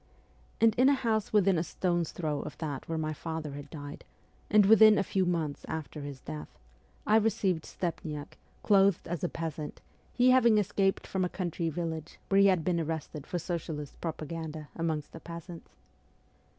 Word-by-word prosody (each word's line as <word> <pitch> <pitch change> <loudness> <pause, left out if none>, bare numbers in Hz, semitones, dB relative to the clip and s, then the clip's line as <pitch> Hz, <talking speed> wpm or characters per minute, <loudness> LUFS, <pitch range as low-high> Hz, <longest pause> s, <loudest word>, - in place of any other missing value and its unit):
And 225 -1 +5
in 260 +2 +7
a 285 - +5
house 225 -5 0
within 195 -4 +4
a - - 0
stone's 175 -2 -1
throw 155 -4 -2
of 135 -2 -7
that 145 -3 -5
where 165 - -1
my 155 0 -1
father 160 -1 -5
had 145 0 -8
died, 145 -2 -8 0.5
and 210 -1 +6
within 215 0 +8
a 195 - +2
few 190 0 0
months 160 -5 -1
after 155 -1 -5
his 140 -2 -7
death, 75 0 -6 0.6
I 215 - +5
received 200 -6 +1
Stepniak, 155 -4 -5 0.2
clothed 195 -4 +4
as 175 +1 -4
a 175 - +1
peasant, 160 -2 -5 0.3
he 250 +1 +4
having 235 -4 +5
escaped 195 -1 +1
from 190 -1 -1
a 180 - 0
country 175 -2 -2
village 160 -1 -4
where 195 0 +5
he 200 - +7
had 185 -4 +3
been 175 -2 +1
arrested 160 -2 -4
for 180 - -2
socialist 160 -4 -5
propaganda 160 -1 -5
amongst 160 -3 -2
the 165 - -9
peasants. 170 0 -9
170 Hz, 175 wpm, -30 LUFS, 155-195 Hz, 0.6 s, within